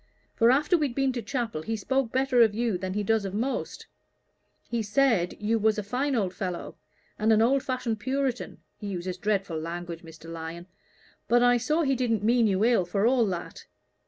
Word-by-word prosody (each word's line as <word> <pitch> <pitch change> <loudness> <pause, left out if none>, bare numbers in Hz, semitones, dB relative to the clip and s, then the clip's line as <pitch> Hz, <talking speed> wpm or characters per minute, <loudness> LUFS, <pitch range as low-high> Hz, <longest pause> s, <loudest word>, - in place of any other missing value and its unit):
For 230 0 +4
after 295 +7 +3
we'd 280 -6 -1
been 270 -1 +1
to 240 - -3
chapel, 225 - -3
he 225 +7 -3
spoke 260 +3 -1
better 260 -1 +3
of 220 -3 +4
you 230 -3 0
than 185 +1 -4
he 210 - 0
does 220 +1 +1
of 195 0 -4
most: 250 +6 -3 0.8
he 235 -1 -1
said 215 -4 +1
you 225 +2 +1
was 220 0 +2
a 210 - -2
fine 255 +7 -1
old 195 -5 0
fellow, 180 -2 -5 0.4
and 215 +1 +3
an 215 - +5
old 260 +5 +3
fashioned 255 -4 -2
Puritan 260 +1 -2 0.2
he 205 - -6
uses 185 -1 -4
dreadful 195 -6 -1
language, 170 +1 -6
Mr. 165 -1 -13
Lyon; 165 +1 -7 0.6
but 240 +1 +4
I 245 0 +5
saw 305 +7 +1
he 270 -2 +2
didn't 230 -5 0
mean 235 +1 +4
you 200 +1 +2
ill, 235 -5 +3
for 195 +4 0
all 240 -2 +3
that. 180 -3 -6
225 Hz, 195 wpm, -27 LUFS, 190-250 Hz, 0.8 s, an